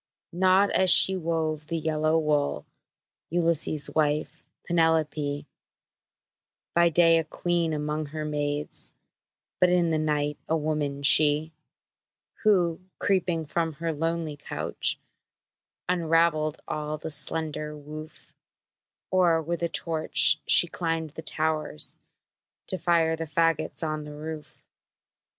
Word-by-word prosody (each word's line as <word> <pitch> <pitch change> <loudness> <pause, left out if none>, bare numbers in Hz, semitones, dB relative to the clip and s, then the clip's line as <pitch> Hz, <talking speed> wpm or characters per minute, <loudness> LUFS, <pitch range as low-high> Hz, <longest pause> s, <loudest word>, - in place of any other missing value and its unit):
Not 190 +3 +3
as 190 0 +3
she 190 +2 +7
wove 160 -3 -2
the 165 - -2
yellow 155 0 0
wool, 150 -2 0 0.6
Ulysses' 165 -3 0
wife, 150 -1 -1 0.2
Penelope; 155 -3 0 1.3
By 170 0 +4
day 165 0 +5
a - - -1
queen 170 +1 -1
among 150 0 -3
her 155 +1 -5
maids, 145 -1 -3 0.7
But 180 - +4
in 175 -2 +2
the 155 - +1
night 150 -1 -1
a 160 - +2
woman, 150 -2 -2
she, 150 +2 +4 0.9
Who, 180 -6 +2 0.2
creeping 175 -4 0
from 165 +2 -2
her 165 +2 -3
lonely 165 -1 -3
couch, 145 - -2 0.9
Unraveled 165 -3 +1
all 155 0 -3
the 160 - -6
slender 150 +1 -2
woof; 155 +1 -11 0.8
Or, 175 -3 +3
with 170 +2 -4
a 170 - 0
torch, 160 -2 +3
she - - +7
climbed 165 -2 -3
the 160 - -8
towers, 155 - -2 0.7
To 185 - +2
fire 165 -2 +2
the 165 0 -5
fagots 165 +2 0
on 155 -1 -3
the 150 0 -9
roof! 155 0 -8
160 Hz, 120 wpm, -26 LUFS, 150-170 Hz, 1.3 s, she